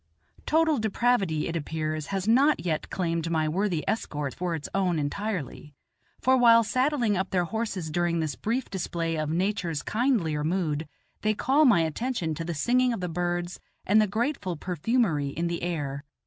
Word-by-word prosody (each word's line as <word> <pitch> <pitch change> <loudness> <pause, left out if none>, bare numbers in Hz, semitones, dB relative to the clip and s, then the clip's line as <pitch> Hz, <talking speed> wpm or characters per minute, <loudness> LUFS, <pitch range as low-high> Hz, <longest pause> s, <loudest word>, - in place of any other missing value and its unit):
Total 315 -3 +3
depravity, 215 -7 +1
it 165 - -4
appears, 155 -1 -3
has 195 0 -3
not 270 +2 +4
yet 155 -3 -1
claimed 165 -2 -1
my 160 -2 +1
worthy 175 0 0
escort 150 - -2
for 175 -2 -2
its 155 - -6
own 185 -3 +1
entirely, 150 - -4 0.4
for 260 +1 +4
while 230 -2 +6
saddling 255 -1 +1
up 190 +1 -1
their 180 -2 +1
horses 195 -5 -3
during 175 0 0
this 155 -3 -1
brief 235 - -2
display 170 -3 -2
of 155 -1 -2
nature's 175 -3 -1
kindlier 210 - 0
mood 160 -2 -1 0.3
they 215 0 +1
call 280 +8 +3
my 230 -10 +5
attention 165 - -2
to 165 - -4
the 170 0 -4
singing 250 - +2
of 230 - -4
the 180 - -2
birds 175 +1 -2 0.3
and 215 +3 +5
the 215 - +2
grateful 215 - -2
perfumery 180 - 0
in 165 +5 -3
the 170 0 -2
air. 145 -5 -3
180 Hz, 170 wpm, -27 LUFS, 160-225 Hz, 0.4 s, while